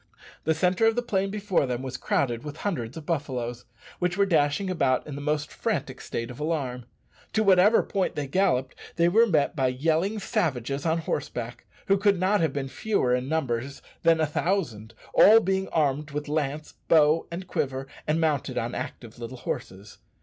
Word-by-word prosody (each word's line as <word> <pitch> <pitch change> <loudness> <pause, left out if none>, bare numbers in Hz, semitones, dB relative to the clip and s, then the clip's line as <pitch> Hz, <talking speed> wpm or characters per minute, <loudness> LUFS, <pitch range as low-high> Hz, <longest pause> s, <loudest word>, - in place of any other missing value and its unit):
The 160 +1 +2
centre 180 +6 +2
of 225 - +3
the 245 - 0
plain 195 -4 0
before 195 -7 0
them 125 0 -3
was 130 -1 -5
crowded 120 -3 -1
with 150 0 -7
hundreds 130 - -2
of 160 - -8
buffaloes, 125 -7 -3 0.3
which 180 +1 0
were 200 - +4
dashing 160 0 +2
about 140 -8 +1
in 150 - -7
the 140 - -6
most 150 +1 -1
frantic - - -3
state 115 +1 -4
of 125 - -11
alarm. 140 -6 -2 0.5
To 220 - +2
whatever 200 +2 +5
point 195 -2 -1
they 145 - -2
galloped 135 -4 +1 0.2
they 170 0 +3
were 225 +6 +5
met 155 -7 +1
by 135 -3 +2
yelling 160 +10 0
savages 140 - -1
on 160 +1 +2
horseback, 120 -6 -4 0.2
who 195 0 +3
could 200 -2 +3
not 190 +2 +2
have 160 -3 +2
been 140 -1 -3
fewer 135 - 0
in 125 +1 -1
numbers 140 -4 -2 0.2
than 165 -1 +4
a 160 - +3
thousand, 150 - -2 0.2
all 220 +2 +8
being 190 -1 0
armed 150 -1 0
with 150 0 -4
lance, 150 0 -2
bow, 155 0 +4
and 175 +2 -6
quiver, 135 -5 -2 0.2
and 155 +2 +1
mounted 145 -5 0
on 115 +1 -2
active 120 0 -7
little 120 +2 -7
horses. 100 -3 -6
150 Hz, 185 wpm, -26 LUFS, 130-185 Hz, 0.5 s, all